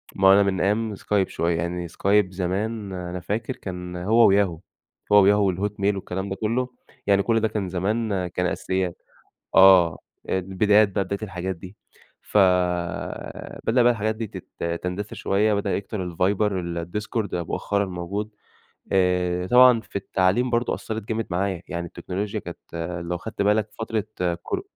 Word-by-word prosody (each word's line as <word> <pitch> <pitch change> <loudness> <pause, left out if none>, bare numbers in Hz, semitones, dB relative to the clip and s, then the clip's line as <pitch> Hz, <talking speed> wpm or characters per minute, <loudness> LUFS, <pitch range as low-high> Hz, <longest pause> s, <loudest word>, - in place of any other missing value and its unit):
ما 95 - +4
هو 95 - +9
أنا 100 +1 +6
من 95 -2 0
أيام 105 +2 0
Skype 100 0 0
شوية، 85 0 -1
يعني 85 +1 -3
Skype 100 +3 +2
زمان 100 +3 -3
أنا 90 0 -5
فاكر، 110 +8 -3
كان 90 -1 -7
هو 105 +4 +5
وYahoo 95 -5 +2 0.5
هو 105 -1 +7 0.3
وYahoo - - -5
والHotmail 100 0 0
والكلام 95 0 -4
ده 95 - -3
كله، 115 +5 -1 0.4
يعني 100 -1 +4
كل 115 +1 +2
ده 110 - +1
كان 105 -4 -3
زمان 100 +1 -1
كان 90 +1 -2
أساسيات. 95 0 -2 0.5
آه، 95 -3 +7 0.3
البدايات 100 +3 +3
بقى 100 0 0
بداية 100 +2 -4
الحاجات 95 -2 -4
دي. 90 +4 -12 0.5
فبدأ 90 +5 0
بقى 120 - +6
الحاجات 110 -1 -1
دي 110 0 -4
تت 85 -3 -5
تندثر 95 +3 -4
شوية، 105 +2 +1
بدأ 100 0 0
يكتر 95 -2 -4
الViber، 100 +4 +1
الDiscord 90 +4 -3
مؤخرًا 100 +4 -1
موجود. 95 +4 -4 0.6
آآ، 90 -1 +1
طبعًا 125 +2 +7
في - - -10
التعليم 100 +5 +1
برضه 120 +1 +1
أثرت 110 0 -5
جامد 110 0 -1
معايا، 95 0 -1
يعني 85 -1 -4
التكنولوجيا 95 +4 -4
كانت- - - -8 0.5
لو 90 - -1
أخدت 100 +3 -4
بالك- 105 +1 +2
فترة 110 -2 -2 0.4
كور - - -3
95 Hz, 155 wpm, -24 LUFS, 90-105 Hz, 0.6 s, هو